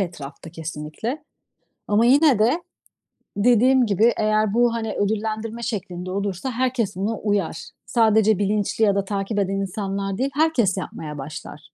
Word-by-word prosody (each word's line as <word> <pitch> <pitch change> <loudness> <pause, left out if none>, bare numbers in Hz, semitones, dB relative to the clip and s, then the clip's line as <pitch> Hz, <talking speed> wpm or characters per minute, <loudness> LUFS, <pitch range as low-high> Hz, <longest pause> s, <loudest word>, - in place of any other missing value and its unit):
etrafta 165 -4 -6
kesinlikle 165 - -5 0.6
ama 210 +3 +3
yine 275 -2 +5
de 250 +11 +3 0.8
dediğim 245 +4 +4
gibi 220 +3 +3
eğer 215 -1 +1
bu, 240 0 +3
hani, 225 -2 -3
ödüllendirme 220 +2 -2
şeklinde 185 -5 -4
olursa 200 +5 -3
herkes 245 -5 -1
buna 205 +3 -2
uyar. 200 -6 -2 0.2
Sadece 220 -3 +3
bilinçli 205 +2 0
ya 200 -1 +2
da 200 0 0
takip 200 +1 -2
eden 195 0 0
insanlar 195 0 -3
değil, 270 +2 0
herkes 270 - +2
yapmaya 150 -5 -6
başlar. 150 +1 -8
210 Hz, 140 wpm, -23 LUFS, 195-230 Hz, 0.8 s, yine